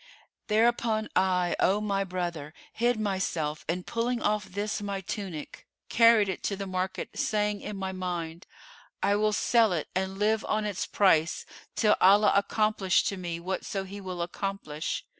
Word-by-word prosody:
Thereupon 220 0 +2
I, 180 -1 +2
O 195 +2 +3
my 200 -2 0
brother, 175 -5 -4 0.2
hid 240 0 +1
myself 180 -7 -2
and 180 +2 -2
pulling 235 +1 -1
off 210 -2 0
this 205 +3 -3
my 200 -1 -3
tunic, 190 -5 -6 0.2
carried 230 -3 +5
it 190 - -3
to 200 - 0
the 195 0 -5
market, 185 0 -3
saying 210 -1 0
in 210 - -6
my 190 0 -3
mind, 175 -2 -5 0.6
'I 200 - +3
will 215 0 +2
sell 225 0 +3
it 160 - -3
and 190 +1 -2
live 215 +1 +1
on 215 0 0
its 205 -3 -3
price, 170 -5 +2 0.3
till 210 -1 +4
Allah 205 +3 +6
accomplish 200 -2 +2
to 200 - -4
me 170 -2 -4
whatso 190 +2 -3
he 200 +1 -8
will 180 -2 -4
accomplish. 175 -4 -4
195 Hz, 160 wpm, -28 LUFS, 180-210 Hz, 0.6 s, Allah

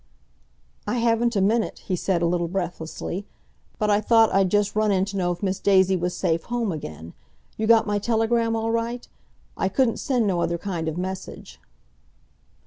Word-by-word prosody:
"I - - 0
haven't 235 0 +1
a 200 - +2
minute," 220 +3 0
he 185 - -1
said 175 -1 0
a - - +3
little 175 0 0
breathlessly. 175 +1 -4 0.5
"But 210 -1 +1
I 205 +1 +3
thought 225 0 +4
I'd 195 -1 +3
just 205 +1 +1
run 215 -1 +2
in 190 -1 +2
to 200 0 -7
know 180 -2 0
if 175 +2 -6
Miss 190 0 -1
Daisy 190 -1 +4
was 180 0 -2
safe 165 0 0
home 235 -4 -1
again. 80 - -7 0.4
You 220 - -2
got 230 -1 +5
my 205 -1 0
telegram 230 +1 +1
all 225 0 -1
right? 230 +1 -2 0.5
I 190 - 0
couldn't 240 +3 +1
send 250 -5 0
no 180 -4 0
other 170 0 0
kind 170 -3 -4
of 160 +1 -3
message." 185 +1 -6
200 Hz, 185 wpm, -24 LUFS, 180-225 Hz, 0.5 s, got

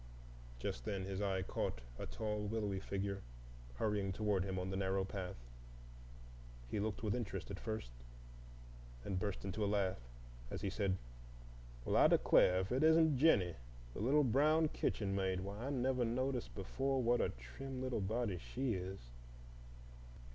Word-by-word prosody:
Just - - -3
then 95 -1 -2
his 95 0 -3
eye 95 -2 0
caught 95 - -2 0.2
a - - -4
tall, 105 - -2
willowy 105 -3 -1
figure 100 0 -3 0.5
hurrying 100 - 0
toward 100 -1 +1
him 95 -1 -3
on 90 +1 -2
the - - -2
narrow 95 0 +1
path. 95 -2 -5 1.4
He - - 0
looked 105 +1 -2
with 105 -2 +1
interest 100 -6 -3
at 95 - -5
first, 110 - -4 1.1
and 95 - -3
then 90 - +1
burst 100 -1 -3
into 100 +2 -2
a - - +2
laugh 100 -5 +1 0.5
as - - -4
he 100 - -1
said, 95 -2 0 0.9
"Well, - - +1
I - - +8
declare, 90 0 +5
if 95 - -4
it 130 +2 +2
isn't 160 -3 +5
Jennie, 100 - +4 0.4
the - - -6
little 140 +8 +4
brown 150 +5 +4
kitchen 100 -8 -1
maid! 95 -1 0
Why, 100 +6 -5
I - - -1
never 130 -2 +1
noticed 125 +2 -1
before 135 +7 -1
what 120 +1 +3
a - - +2
trim 130 - -7
little 130 -4 -1
body 105 -2 -1
she 130 +5 -2
is. 95 0 -4
100 Hz, 160 wpm, -38 LUFS, 95-125 Hz, 1.4 s, I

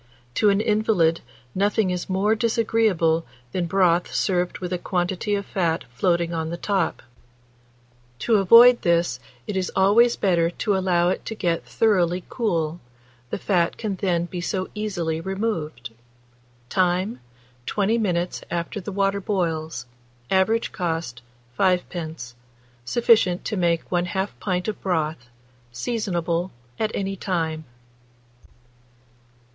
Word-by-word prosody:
To 210 - +3
an 200 +1 +3
invalid 210 -7 +2 0.3
nothing 200 0 +1
is 180 +1 -4
more 195 +3 +2
disagreeable 220 -7 +2 0.3
than 175 +3 -1
broth 180 -1 +2
served 180 -2 0
with 180 -1 -4
a 180 - -1
quantity 185 +3 -1
of 200 0 -3
fat 165 -4 -1
floating 170 +4 +1
on 160 -1 -2
the 170 - -4
top; 190 -5 -1 1.1
to 220 - +2
avoid 235 +5 +7
this, 170 -7 +1 0.3
it 205 - -4
is 185 -1 -1
always 215 +5 +5
better 170 -4 +2
to 200 +3 -1
allow 180 -2 +2
it 185 - -2
to 225 - -4
get 170 -5 -1
thoroughly 180 -5 +2
cool, 170 -8 -1 0.5
the - - -2
fat 180 -4 +1
can 210 -3 -3
then 175 -3 0
be 175 0 -6
so 185 +2 -2
easily 175 -7 -2
removed. 165 - -3 0.8
Time. 185 - 0 0.5
20 215 +3 +1
minutes 180 -4 -1
after 170 +4 -3
the 205 - -6
water 200 0 0
boils. 160 - -2 0.5
Average 220 +5 +2
cost, 165 - -3 0.4
5d. 170 -8 -1 0.5
Sufficient 210 - +3
to - - -2
make 170 -3 +1
1/2 180 +3 0
pint 180 -2 -2
of 215 - -4
broth. 155 -8 -1 0.4
Seasonable 175 - -2 0.3
at 215 - +1
any 195 0 -2
time. 165 -5 -2
180 Hz, 125 wpm, -23 LUFS, 170-205 Hz, 1.1 s, avoid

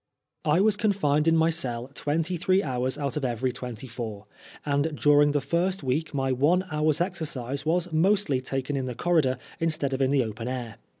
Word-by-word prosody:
I 155 +5 +3
was 210 0 +3
confined 165 -9 +1
in 165 0 +5
my 160 +1 +3
cell 125 -5 -3
twenty 160 +5 -1
three 185 +3 +2
hours 130 0 -2
out 140 -1 -2
of 150 - -3
every 125 0 0
twenty 125 -1 -7
four, 110 -4 -6 0.4
and 145 +1 0
during 145 0 +5
the 145 -1 0
first 175 +7 0
week 145 +5 -1
my 135 -2 -1
one 155 +9 +2
hour's 155 +1 +1
exercise 150 -7 -3
was 175 +1 0
mostly 170 -5 +2
taken 135 +2 -3
in 130 -1 -2
the 125 - -4
corridor 155 -7 +2 0.2
instead 155 -4 0
of 130 - -1
in 130 - +3
the 135 -2 +3
open 115 +1 -5
air. 125 -3 -5
145 Hz, 190 wpm, -26 LUFS, 130-165 Hz, 0.4 s, in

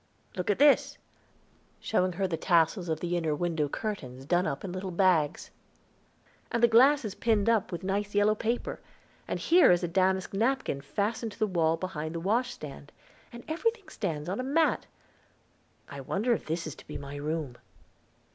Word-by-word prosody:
Look 180 +1 -3
at 205 - +2
this," 285 0 +4 0.8
showing 185 -4 0
her 190 +2 -1
the 175 - -2
tassels 170 +2 +2
of 160 -1 -2
the 175 0 -1
inner 160 -3 0
window 160 -2 -1
curtains 135 - -5
done 175 +5 +2
up 140 - -4
in 190 - -5
little 185 +1 -4
bags. 170 -4 +1 1.0
"And 235 0 -1
the - - +9
glass 255 +4 +5
is 205 - -4
pinned 220 -2 +1
up 225 -4 +2
with 175 +1 -5
nice 200 +2 -2
yellow 205 +1 +4
paper; 230 +3 -2 0.5
and - - -3
here 350 +2 +5
is 175 0 +2
a - - +1
damask 190 +2 +1
napkin 230 - 0
fastened 210 - -2
to - - -16
the 220 - +2
wall 165 -4 +1
behind 165 -3 -5
the - - -2
washstand. 195 - -3 0.4
And 235 0 -10
everything 410 +6 -2
stands 155 -6 -4
on 190 +5 -3
a - - -1
mat. 310 +5 +1 1.0
I 140 -1 -8
wonder 210 - 0
if - - -4
this 165 +2 -2
is 155 - -5
to - - -15
be - - -6
my 140 0 -8
room?" 150 -4 -3
185 Hz, 180 wpm, -29 LUFS, 160-225 Hz, 1.0 s, the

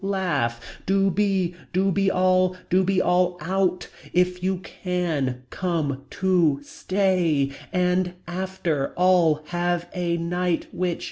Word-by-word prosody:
Laugh. 180 -12 0 0.3
Do 195 0 +3
be. 190 -2 +1 0.2
Do 190 +2 +2
be 195 +1 +2
all. 185 0 +2
Do 185 +2 +4
be 190 0 +2
all 180 0 +2
out. 185 +2 0 0.3
If 180 0 +2
you 190 +1 0
can. 160 -9 -2
Come. 155 -7 -2
To 175 -7 +2
stay. 175 -6 +1 0.2
And. 180 0 +1
After. 175 -5 -2
All. 175 -4 +3
Have. 175 0 -1
A. 175 -2 -1
Night. 175 0 -1
Which. 180 -2 -1
180 Hz, 125 wpm, -24 LUFS, 170-185 Hz, 0.3 s, Do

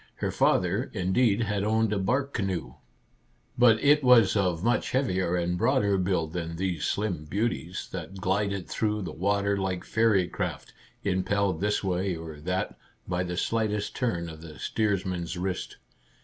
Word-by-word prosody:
Her - - -2
father, - - +2
indeed, 100 +4 +2
had 105 -2 -1
owned 110 0 +2
a 100 - 0
bark 130 +8 0
canoe, 95 -7 -2 0.8
but 120 -2 +5
it 145 0 +5
was 115 -6 +6
of 90 -4 +1
much 120 +2 +1
heavier 95 -9 +1
and 90 0 -1
broader 100 +2 +3
build 90 -4 0
than 85 -1 -4
these 90 -3 -2
slim 95 -7 -1
beauties, 95 -1 -2
that 90 0 -6
glided 100 0 -1
through 105 -2 -1
the 85 - -5
water 100 +3 +1
like 95 -2 -2
fairy 105 -5 +2
craft, - - -4 0.3
impelled 95 -1 0
this 105 0 +1
way 95 0 0
or 80 -2 -8
that 90 +4 -3 0.3
by 90 0 0
the 90 -1 -4
slightest 105 -1 -1
turn 85 -10 -1
of 80 -1 -9
the 80 -2 -10
steersman's 95 -5 -1
wrist. 95 +1 -3
95 Hz, 155 wpm, -27 LUFS, 90-105 Hz, 0.8 s, was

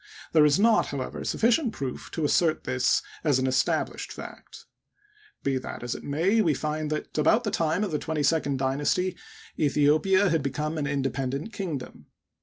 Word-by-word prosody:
There 155 -2 +6
is 150 +5 +3
not, 225 +1 +4
however, 140 -2 -5
sufficient 235 +1 +1
proof 130 -2 -5
to 160 - -1
assert 160 +1 +2
this 130 0 +1 0.2
as 145 -4 +3
an 130 - 0
established 130 0 0
fact. - - -10 0.8
Be 135 -1 0
that 125 - -7
as 120 - -2
it - - -8
may, 175 +10 +2
we 160 -8 +2
find 155 +1 -2
that, 150 0 -4
about 220 +10 +4
the 210 - -2
time 165 +4 0
of 200 - -2
the 150 - -1
twenty 160 -2 -2
second 145 -3 +1
dynasty, 145 +8 0 0.4
Aethiopia 155 +7 +3
had 165 -2 +2
become 150 +4 -2
an 145 - -1
independent 140 - -2
kingdom. 160 -10 -6
150 Hz, 170 wpm, -26 LUFS, 140-180 Hz, 0.8 s, There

